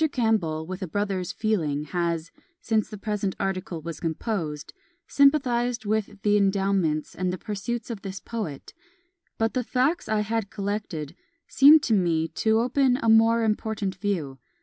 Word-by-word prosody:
Campbell, 205 - 0
with 185 +2 -6
a 185 - -3
brother's 195 0 -2
feeling, 175 -11 -1
has 170 0 -2 0.3
(since 220 -9 0
the 210 - -7
present 205 -2 -2
article 185 -4 -3
was 165 -1 -6
composed) 160 -3 -3 0.3
sympathised 245 -5 +2
with 210 -1 -1
the 210 0 +4
endowments 195 -6 +1
and 185 0 -2
the 185 - -4
pursuits 220 +5 -4
of 215 -4 -6
this 195 -1 -6
poet; 205 -13 -6 0.6
but 225 0 0
the 255 - 0
facts 270 +9 0
I 215 -1 +2
had 220 -1 -2
collected 195 -7 -4 0.3
seemed 295 +3 +7
to 230 - +1
me 170 -5 +2
to 220 0 +1
open 255 +1 +2
a 230 - 0
more 225 +1 +5
important 215 -2 -1
view. 175 -8 -3
205 Hz, 150 wpm, -25 LUFS, 175-225 Hz, 0.6 s, seemed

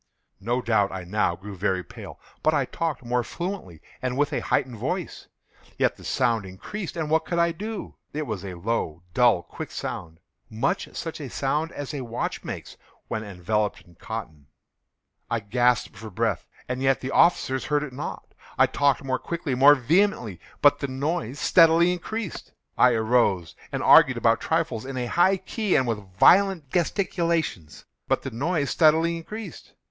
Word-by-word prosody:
No 120 +5 -1
doubt 105 -4 +2
I 95 -1 -5
now 90 -1 0
grew 100 +3 -9
very 95 -1 0
pale;—but - - -5
I - - +2
talked 160 -6 -3
more 125 0 0
fluently, 170 - -6 0.2
and 130 0 -2
with 145 0 +1
a - - +1
heightened 125 -3 -1
voice. - - -4 0.5
Yet - - +2
the - - -15
sound 115 -5 +1
increased—and 160 - -5
what 160 0 +3
could 170 - -3
I 170 0 +3
do? 210 +5 -6 0.2
It 150 +1 -3
was 110 -6 -4
a 95 -2 -6
low, 85 -4 -2
dull, 120 -8 +4
quick - - -8
sound—much 85 +7 -5
such 165 -1 -5
a 140 - -6
sound 150 +6 -1
as 145 +1 -6
a 140 - -3
watch 120 -1 -4
makes - - -7 0.3
when 110 - -2
enveloped 105 +1 -2
in 85 - -20
cotton. 80 -7 -7 0.8
I 115 - 0
gasped 120 +2 +1
for 110 +2 -9
breath—and 115 +4 -3
yet 135 0 +3
the 130 - -4
officers 130 -6 +3
heard 150 0 +1
it 135 -4 -7
not. 140 +4 -7 0.2
I - - +6
talked 140 -2 +1
more 130 -1 -1
quickly—more 145 -4 +4
vehemently; 130 - +1 0.2
but 145 - +6
the 140 - -2
noise 140 0 -2
steadily 170 +1 +5
increased. 200 +2 -5 0.2
I 125 - +5
arose 110 -7 +1 0.2
and - - -2
argued - - +7
about - - +2
trifles, 110 - -1
in 135 0 -6
a 125 - -1
high 180 +9 +3
key 195 +2 -1
and 130 - +3
with 105 -6 -5
violent 185 - +5
gesticulations; 170 - -1 0.2
but - - +1
the - - -5
noise 145 +4 -1
steadily 165 +1 +4
increased. 205 +2 -9
130 Hz, 165 wpm, -25 LUFS, 110-165 Hz, 0.8 s, argued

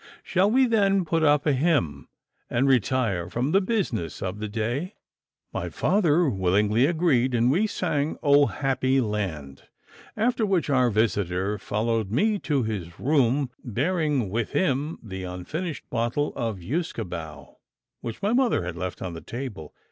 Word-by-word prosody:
Shall 190 +2 +2
we 260 +4 +4
then 200 -5 +2
put 165 0 0
up 150 -2 +3
a 150 - +3
hymn, 135 - 0 0.4
and 130 +4 +1
retire 115 -8 +1
from 125 +8 -1
the 195 - +4
business 180 - -2
of 95 +2 -4
the 110 - -3
day?' 120 - -3 0.6
My - - -3
father 175 -4 +2
willingly 105 +3 +2
agreed, 145 -7 +2
and 120 +2 +3
we 195 +9 +2
sang 160 -7 -1
'Oh, 145 -1 +5
happy 135 -1 0
land!' 95 - -3 0.5
after 235 +1 +1
which 190 -7 +1
our 130 -2 +4
visitor 100 -2 0
followed 110 +1 -1
me 205 - +1
to 145 -7 0
his 95 -7 -5
room, 135 -2 +2
bearing 145 - 0
with 115 +1 -2
him 150 -2 0
the 95 -4 -6
unfinished 145 - -5
bottle 120 +5 -1
of 115 -4 -2
usquebaugh 85 - -5 0.5
which 115 - -7
my 205 +3 +2
mother 245 - +2
had 90 -1 -4
left 90 +1 -5
on 90 -2 -4
the 80 - -8
table. 115 - -7
130 Hz, 150 wpm, -25 LUFS, 105-160 Hz, 0.6 s, Oh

